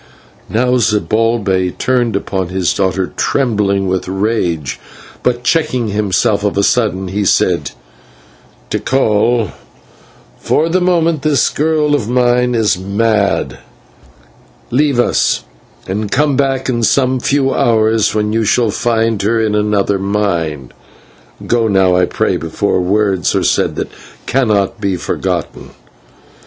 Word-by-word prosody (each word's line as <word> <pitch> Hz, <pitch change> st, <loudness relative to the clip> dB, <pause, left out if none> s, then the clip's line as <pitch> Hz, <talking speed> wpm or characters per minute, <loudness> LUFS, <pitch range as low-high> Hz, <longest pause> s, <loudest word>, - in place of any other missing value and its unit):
Now 125 Hz, +3 st, +1 dB
Zibalbay 105 Hz, -4 st, 0 dB
turned 125 Hz, -3 st, 0 dB
upon 95 Hz, -2 st, -2 dB
his 90 Hz, -2 st, 0 dB
daughter, 95 Hz, -1 st, -1 dB
trembling 105 Hz, -7 st, 0 dB
with 95 Hz, 0 st, -2 dB
rage, 95 Hz, -6 st, -2 dB, 0.4 s
but, 120 Hz, -1 st, -1 dB
checking 130 Hz, -5 st, 0 dB
himself 100 Hz, 0 st, 0 dB
of 100 Hz, -1 st, -1 dB
a 100 Hz, -, +2 dB
sudden, 95 Hz, -5 st, 0 dB
he 100 Hz, +2 st, -1 dB
said: -, -, +1 dB, 1.0 s
"Tikal, 115 Hz, -4 st, +1 dB, 0.9 s
for 160 Hz, +2 st, +1 dB
the 185 Hz, +2 st, +1 dB
moment 170 Hz, -4 st, +1 dB
this 145 Hz, -5 st, +2 dB
girl 150 Hz, -1 st, 0 dB
of 120 Hz, -7 st, -1 dB
mine 125 Hz, 0 st, +2 dB
is 110 Hz, -5 st, +1 dB
mad; 100 Hz, +2 st, 0 dB, 1.1 s
leave 140 Hz, 0 st, +1 dB
us, 120 Hz, -, +1 dB, 0.4 s
and 100 Hz, +2 st, -3 dB
come 145 Hz, 0 st, +2 dB
back 135 Hz, -1 st, 0 dB
in 120 Hz, -2 st, -1 dB
some 130 Hz, +2 st, +2 dB
few 135 Hz, +1 st, +1 dB
hours, 110 Hz, -2 st, +2 dB
when 105 Hz, 0 st, 0 dB
you 115 Hz, 0 st, +1 dB
shall 110 Hz, +1 st, +2 dB
find 115 Hz, -1 st, 0 dB
her 115 Hz, +3 st, +1 dB
of 110 Hz, -1 st, 0 dB
another 105 Hz, -2 st, +1 dB
mind. 85 Hz, -9 st, -2 dB, 0.7 s
Go 115 Hz, -1 st, +1 dB
now, 95 Hz, -3 st, +3 dB
I 90 Hz, 0 st, +3 dB
pray, -, -, -1 dB
before 90 Hz, +4 st, -1 dB
words 95 Hz, 0 st, 0 dB
are -, -, +1 dB
said -, -, +1 dB
that -, -, -4 dB, 0.3 s
cannot 110 Hz, -4 st, 0 dB
be 100 Hz, -2 st, 0 dB
forgotten." 90 Hz, -, -4 dB
110 Hz, 125 wpm, -15 LUFS, 100-125 Hz, 1.1 s, now